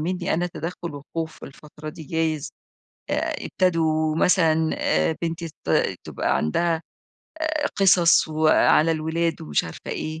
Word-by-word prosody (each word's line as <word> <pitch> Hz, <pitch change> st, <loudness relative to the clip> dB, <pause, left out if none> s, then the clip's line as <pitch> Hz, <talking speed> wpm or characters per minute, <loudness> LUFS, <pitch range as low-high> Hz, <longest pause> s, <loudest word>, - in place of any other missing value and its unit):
مني 175 Hz, +1 st, -1 dB
أنا 175 Hz, +2 st, 0 dB
تدخل 170 Hz, -1 st, -6 dB, 0.2 s
وخوف 160 Hz, -1 st, -4 dB
الفترة 150 Hz, +2 st, -11 dB
دي 155 Hz, +1 st, -8 dB
جايز، 160 Hz, -1 st, -1 dB, 0.6 s
آآ، -, -, -1 dB
ابتدوا 160 Hz, -3 st, +1 dB
مثلًا 160 Hz, -3 st, +3 dB, 0.5 s
بنتي 165 Hz, 0 st, -3 dB
ت -, -, -11 dB, 0.4 s
تبقى -, -, -1 dB
عندها 165 Hz, -, 0 dB, 0.7 s
آآ 310 Hz, -2 st, 0 dB
قصص 175 Hz, -4 st, +5 dB
و 155 Hz, 0 st, 0 dB
على 160 Hz, +1 st, +5 dB
الولاد 160 Hz, +1 st, -1 dB
ومش 75 Hz, -1 st, 0 dB
عارفة -, -, -10 dB
إيه، 155 Hz, 0 st, -4 dB
160 Hz, 130 wpm, -24 LUFS, 155-170 Hz, 0.7 s, قصص